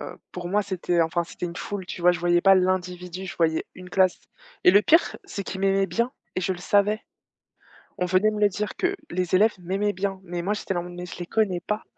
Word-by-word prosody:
heu, - - -21
pour 175 -1 -5
moi, 210 +2 +2
c'était 180 -3 -1
enfin, 165 +1 +1
c'était 175 - -6
une 170 - -6
foule, 195 0 -5
tu 180 - -7
vois? 180 +1 +6
Je 175 - -3
voyais 175 0 +3
pas 195 +1 +7
l'individu, 180 0 -1
je 190 - -7
voyais 160 -1 +1
une 185 0 -10
classe 185 0 +3 0.5
et 180 - +8
le 205 - +6
pire, 325 +9 +4
c'est 200 - -5
qu'ils 190 +1 -6
m'aimaient 195 0 +3
bien 235 +8 0 0.2
et 185 - -1
je 190 - 0
le 180 - -9
savais. 205 +4 +2 1.0
On 180 - +1
venait 185 +4 +3
me 210 - -4
le 205 - +5
dire 210 +2 -4
que 385 +2 0 0.2
les 180 0 0
élèves 215 +3 +5
m'aimaient 195 +4 -1
bien, 195 +1 -2
mais 175 -1 -4
moi, 195 +4 0
j'étais 195 - -3
là 175 - -1
en 175 - -4
mode: 175 - -9
«Mais 180 - -5
je 180 - -9
les 175 - -5
connais 195 -5 +1
pas». 210 +4 -3
185 Hz, 250 wpm, -25 LUFS, 175-205 Hz, 1.0 s, et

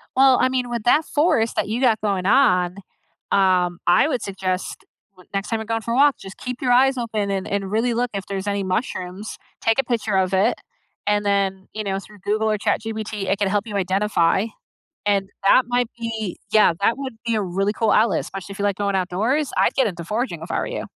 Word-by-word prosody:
Well, 265 -1 +6
I 255 - +3
mean, 250 -1 -1
with 235 -2 -3
that 295 +7 +4
forest 295 -7 +1
that - - 0
you 230 +4 -2
got 230 -4 +3
going 195 -3 -1
on, 180 -6 +3 0.5
um, 180 -2 +2
I 175 - +5
would 255 -6 -1
suggest, 190 -1 -3 0.4
n 180 - -17
next 195 0 -2
time 225 -1 -1
you're 220 - -5
going 225 0 -2
for 230 - -4
a - - +1
walk, 285 0 +5
just 190 0 -10
keep 250 -1 -6
your 250 -2 +1
eyes 265 +2 +4
open 215 -4 -2
and 190 -1 -2
and 200 -1 -2
really 235 +3 +1
look 245 0 0
if 195 -1 -4
there's 195 0 -4
any 200 -1 -1
mushrooms, 185 0 -3 0.2
take 225 +2 +2
a - - +4
picture 230 -4 -1
of 190 0 +1
it, 200 +5 +3 0.5
and 205 0 +1
then, 195 -1 0
you 215 - -4
know, 195 -1 -2
through 210 0 -15
Google 215 +3 0
or 215 - +1
ChatGPT, 220 -2 -2
it 195 +1 0
can 205 - +1
help 205 +2 0
you 210 -3 -6
identify, 190 0 +1 0.6
and 200 -1 +1 0.2
that 255 - +6
might 245 -1 +1
be 225 -4 -4
yeah, 215 -5 +5
that 230 - +2
would 265 -4 -6
be 230 -1 +1
a 215 - +1
really 195 +3 -1
cool 225 0 +1
outlet, 215 -5 +3
especially 195 +1 -8
if 195 - -12
you - - -1
like 200 -2 0
going 200 -1 0
outdoors. 220 +11 0
I'd - - +3
get 265 - +3
into 175 -3 -5
foraging 210 -2 -3
if 165 - -8
I - - 0
were - - -2
you. - - -4
210 Hz, 230 wpm, -22 LUFS, 195-235 Hz, 0.6 s, Well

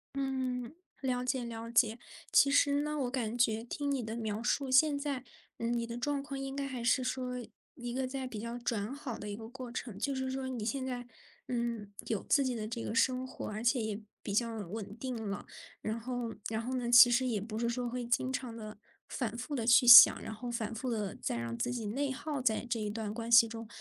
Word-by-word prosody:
嗯， 260 -3 -2 0.3
了 250 -2 -1
解 255 0 -1
了 230 -1 -6
解。 230 -1 +3 0.3
其 275 - +6
实 285 0 +4
呢， 300 0 -2
我 250 -3 -1
感 240 -4 -2
觉 225 -2 +2
听 285 +4 -3
你 270 -3 -1
的 220 +1 -5
描 220 -1 -3
述， 270 +2 0
现 285 +3 +5
在， 280 -3 -3 0.3
呃， 230 - -2
你 235 0 -1
的 235 0 -5
状 280 +3 -1
况 275 -1 -6
应 270 0 -5
该 280 0 -2
还 255 -3 -5
是 245 +2 +3
说 250 -1 -3 0.3
一 240 -1 -6
个 260 +1 -1
在 260 0 -4
比 225 -4 -6
较 235 +2 -5
转 230 -1 -2
好 275 -4 -6
的 210 - -7
一 205 - -4
个 220 +1 -9
过 250 -1 -8
程。 235 -4 -5
就 275 +7 -1
是 260 0 -2
说 265 0 -3
你 250 -4 -4
现 260 +4 -2
在， 245 -2 -4 0.4
嗯， 235 -4 -3 0.2
有 215 -4 -1
自 280 - +4
己 255 - 0
的 215 -2 -4
这 230 +1 -5
个 - - -4
生 255 +2 +2
活， 260 - -7
而 215 +1 -5
且 240 +1 +3
也 215 -1 -3 0.2
比 200 - -4
较 230 0 +1
稳 205 +1 -6
定 255 0 -3 0.2
了。 200 - -6 0.3
然 220 +2 -3
后 240 -1 -4
然 220 0 -2
后 255 +2 -3
呢， 240 -2 -2
其 245 0 +10
实 240 +2 +2
也 225 -5 -1
不 215 +1 -6
是 235 +1 0
说 240 +1 -2
会 245 0 -4
经 240 +2 0
常 255 -3 -4
地、 215 -2 -8 0.3
反 235 -4 -3
复 250 +5 -4
地 235 -4 -2
去 245 +1 +6
想， 240 +1 +11
然 - - -6
后 240 +3 -6
反 230 -2 -3
复 250 +3 -3
地 210 -4 -2
再 - - -3
让 115 0 -4
自 245 - -1
己 235 -4 -3
内 270 +6 -1
耗 285 +2 -4
在 235 -4 +1
这 230 -1 0
一 210 -1 -2
段 215 -1 -4
关 230 +1 -5
系 235 0 +8
中， 225 0 -7
240 Hz, 255 characters per minute, -32 LUFS, 225-260 Hz, 0.4 s, 想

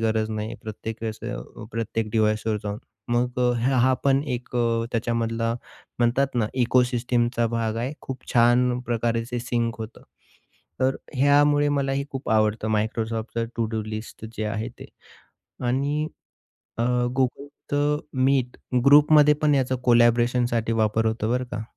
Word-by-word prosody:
गरज 110 -1 0
नाही 110 +1 -4
प्रत्येक 110 +1 -6
वेळेस 110 -1 -4
अ, 120 -1 -7
प्रत्येक 115 -1 -2
डिव्हाइसवर 110 0 +1
जाऊन. 105 0 -4 0.3
मग 125 +1 0
अ, 125 0 +3
ह 130 +3 +1
हा 130 +1 +4
पण 135 0 +3
एक 125 0 -8
अ, 115 -1 +1
त्याच्यामधला 115 0 -1 0.4
म्हणतात 125 +3 +1
ना 115 -3 +1 0.2
इकोसिस्टमचा 120 -1 +1
भाग 115 -1 -1
आहे. 125 +5 -2
खूप 130 -1 -7
छान 120 +1 +4
प्रकारे 115 -1 0
ते 120 - -2
सिंक 120 -2 -1
होतं. 110 +1 -8 0.8
तर 130 +1 +2 0.2
ह्यामुळे 145 +2 +4
मलाही 140 0 -1
खूप 135 -4 -5
आवडतं 110 0 +2
Microsoftचं 110 +1 -2
टू-डू 110 -1 -1
लिस्ट 110 +1 -7
जे 110 - -2
आहे 110 +2 -3
ते. - - -8 0.8
आणि 140 +5 0 0.7
अ, 115 - +1 0.4
Googleचं 145 +2 -1 0.3
Meet 130 -3 +1 0.3
ग्रुपमध्ये 150 +1 +7
पण 150 -1 +4
याचा 130 -1 +1
कोलॅबरेशनसाठी 120 -1 +3
वापर 110 0 +1
होतो 110 0 -1
बरं 125 +1 +1
का. 110 - -3
120 Hz, 140 wpm, -24 LUFS, 110-130 Hz, 0.8 s, ग्रुपमध्ये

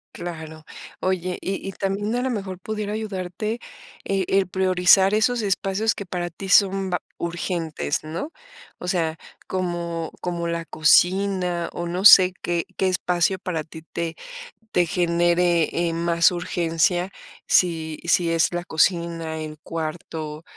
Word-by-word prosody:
Claro. 160 -2 -7 0.4
Oye, 185 -1 -1
y 195 0 -4
y, - - -3
también 200 +4 -2
a 245 - 0
lo 260 - 0
mejor 195 -4 -4
pudiera 210 +1 -4
ayudarte, 215 +1 -4 0.5
eh, 195 -1 0
el 195 -1 +2
priorizar 190 +1 +4
esos 220 +2 +2
espacios 195 +2 0
que 200 - -7
para 175 -1 -3
ti 195 +3 -8
son 195 -1 +4
va 180 - -1 0.2
urgentes, 170 -3 -2
¿no? 165 - -5 0.5
O 180 - -6
sea, 165 -4 0 0.3
como 170 -3 -3
como 175 -1 -3
la 170 0 -3
cocina, 180 +2 +2
o 175 - -4
no 180 +3 -3
sé 185 -2 +9
qué 170 -1 -1
qué 190 - +1
espacio 180 0 +1
para 170 -4 -3
ti 160 +1 -12
te 165 0 -4 0.6
te 180 - +3
genere, 175 -1 +2 0.2
eh, 165 - -3
más 170 +1 +3
urgencia. 175 +1 0 0.4
Si 160 -3 +2
si 170 0 +3
es 165 -1 +2
la 175 0 -2
cocina, 165 -1 0
el 155 -1 -7
cuarto, 160 -1 -5
175 Hz, 145 wpm, -23 LUFS, 165-190 Hz, 0.6 s, sé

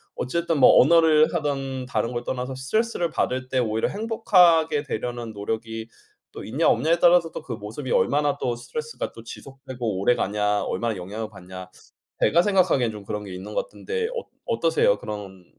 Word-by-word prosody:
어쨌든 165 +3 -1
뭐 - - +7
언어를 155 +1 +5
하든 135 -5 -2
다른 115 0 -1
걸 120 - -3
떠나서 130 +1 -3
스트레스를 175 - -1
받을 130 -3 -2
때 130 - -1
오히려 110 -2 0
행복하게 180 -9 +3
되려는 120 -3 -4
노력이 110 +2 -4 0.5
또 - - -8
있냐 135 +9 0
없냐에 165 +2 +2
따라서 175 -1 +4
또 - - -6
그 125 - -6
모습이 110 +5 -6
얼마나 145 0 +2
또 120 - -1
스트레스가 150 +6 -6
또 115 - -12
지속되고 125 -4 -6
오래가냐 105 -2 +1
얼마나 115 +2 -2
영향을 105 +5 -6
받냐 95 -2 -10 0.5
제가 170 +3 +4
생각하기엔 180 - +2
좀 105 -1 -10
그런 105 +1 -5
게 95 -2 -8
있는 100 +3 -8
것 - - 0
같은데 460 -2 -4
어 485 0 -4 0.2
어떠세요? - - +2
그런 95 -3 -8
130 Hz, 385 characters per minute, -24 LUFS, 110-165 Hz, 0.5 s, 뭐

